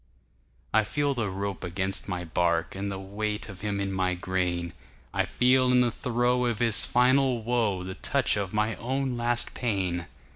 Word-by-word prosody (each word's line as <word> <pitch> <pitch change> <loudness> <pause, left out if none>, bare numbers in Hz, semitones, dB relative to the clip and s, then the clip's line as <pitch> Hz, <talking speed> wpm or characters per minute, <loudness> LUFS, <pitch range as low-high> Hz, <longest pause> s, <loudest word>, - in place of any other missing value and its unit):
I 110 0 +5
feel 145 +5 0
the 115 -5 -2
rope 100 +1 -4
against 95 +2 -2
my 90 -2 -3
bark, 85 0 0
And 100 +1 -3
the 95 - -4
weight 105 +3 -3
of 95 -2 -10
him 100 -1 -2
in 100 -1 -2
my 95 -1 0
grain,I 90 -1 -3
feel 125 0 +3
in 125 0 +5
the 120 -1 +2
throe 125 +2 +1
of 120 -3 -1
his 115 -1 +3
final 125 -1 +3
woeThe 105 -6 0
touch - - +2
of 100 -3 -2
my 105 +1 +1
own 130 +1 -2
last 120 0 +1
pain. 95 -7 -1
105 Hz, 170 wpm, -27 LUFS, 95-120 Hz, -, I